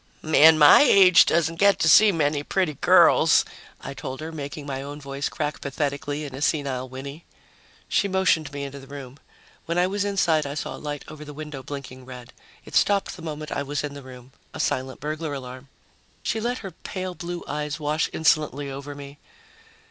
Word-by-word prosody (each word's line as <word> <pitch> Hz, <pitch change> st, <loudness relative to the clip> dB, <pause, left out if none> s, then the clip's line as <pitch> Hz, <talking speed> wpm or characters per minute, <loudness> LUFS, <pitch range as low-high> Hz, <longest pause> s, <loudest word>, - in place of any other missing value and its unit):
"A -, -, -12 dB
man 160 Hz, +1 st, +6 dB
my 150 Hz, -1 st, +8 dB
age 195 Hz, -10 st, +6 dB
doesn't 165 Hz, 0 st, +1 dB
get 200 Hz, -2 st, +5 dB
to -, -, +1 dB
see 210 Hz, +6 st, +7 dB
many 150 Hz, -4 st, 0 dB
pretty 180 Hz, +1 st, -1 dB
girls," -, -, +5 dB, 0.4 s
I 140 Hz, -, -7 dB
told 130 Hz, 0 st, -7 dB
her, 160 Hz, +1 st, -6 dB
making 145 Hz, -1 st, -7 dB
my 135 Hz, -2 st, -4 dB
own 145 Hz, +1 st, -8 dB
voice 140 Hz, 0 st, -4 dB
crack 150 Hz, -1 st, -4 dB
pathetically 145 Hz, +1 st, -3 dB
in 140 Hz, -, -8 dB
a 135 Hz, -, -7 dB
senile 135 Hz, -5 st, -1 dB
whinny. 140 Hz, +5 st, -9 dB, 0.6 s
She 200 Hz, -, +1 dB
motioned 180 Hz, -6 st, +1 dB
me 140 Hz, 0 st, -5 dB
into 140 Hz, 0 st, -7 dB
the 135 Hz, -, -14 dB
room. 135 Hz, -1 st, -10 dB, 0.5 s
When 170 Hz, +1 st, -2 dB
I 180 Hz, -, +4 dB
was 200 Hz, +2 st, -1 dB
inside, 170 Hz, -7 st, +1 dB
I 140 Hz, -, -5 dB
saw 150 Hz, -, -4 dB
a -, -, -12 dB
light 145 Hz, -1 st, -5 dB
over 155 Hz, 0 st, -10 dB
the 145 Hz, -1 st, -10 dB
window 150 Hz, -2 st, -7 dB
blinking 130 Hz, -1 st, -8 dB
red. 125 Hz, -2 st, -11 dB, 0.3 s
It -, -, -13 dB
stopped 200 Hz, -1 st, +2 dB
the -, -, -12 dB
moment 155 Hz, -2 st, -6 dB
I -, -, -2 dB
was 145 Hz, +1 st, -3 dB
in 145 Hz, -1 st, -5 dB
the 140 Hz, -, -9 dB
room. 130 Hz, -1 st, -13 dB, 0.2 s
A -, -, -7 dB
silent 130 Hz, 0 st, -2 dB
burglar 155 Hz, 0 st, -4 dB
alarm. 130 Hz, 0 st, -9 dB, 0.6 s
She 225 Hz, -, -1 dB
let 240 Hz, +3 st, -2 dB
her 195 Hz, -, -6 dB
pale 185 Hz, +2 st, -6 dB
blue 175 Hz, +1 st, -6 dB
eyes 150 Hz, +1 st, -4 dB
wash 150 Hz, +1 st, -1 dB
insolently 150 Hz, -3 st, 0 dB
over 140 Hz, +1 st, -7 dB
me. 140 Hz, 0 st, -11 dB
145 Hz, 200 wpm, -24 LUFS, 140-160 Hz, 0.6 s, my